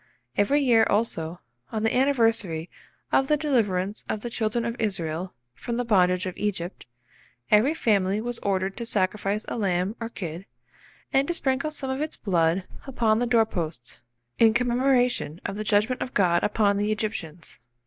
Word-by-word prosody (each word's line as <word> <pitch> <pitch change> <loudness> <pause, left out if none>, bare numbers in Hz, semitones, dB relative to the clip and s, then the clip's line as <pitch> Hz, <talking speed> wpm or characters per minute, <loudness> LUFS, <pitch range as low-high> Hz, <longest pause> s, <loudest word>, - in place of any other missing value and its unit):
Every 280 +9 +3
year, 235 -4 +5
also, 180 -6 0 0.3
on 220 -1 -2
the 225 - +1
anniversary 225 - +1 0.4
of 270 - +3
the 300 - +3
deliverance 210 -10 0
of 215 - -2
the 240 - -5
children 225 +1 -1
of 235 0 -2
Israel 180 -4 -3 0.2
from 235 - -4
the 245 - -1
bondage 185 -4 +3
of 185 - -4
Egypt, 185 -8 -3 0.6
every 235 +9 +4
family 200 -7 +1
was 240 +1 -3
ordered 195 -1 -1
to 235 - -3
sacrifice 205 0 0
a - - -4
lamb 190 0 0
or 230 -1 -4
kid, 175 -3 -7 0.7
and 270 +1 +3
to 345 - 0
sprinkle 275 0 0
some 275 -3 -5
of 265 +2 -3
its 310 0 -3
blood 175 -2 +1 0.2
upon 225 -4 +2
the 245 - 0
door 230 -2 +4
posts, 160 - -5 0.4
in 225 -1 +5
commemoration 245 - +1
of 195 - -3
the 215 - -3
judgment 215 +4 +1
of 255 - -4
God 175 -3 +3
upon 205 -1 +2
the 205 +1 0
Egyptians. 180 -7 -4
215 Hz, 170 wpm, -25 LUFS, 185-240 Hz, 0.7 s, year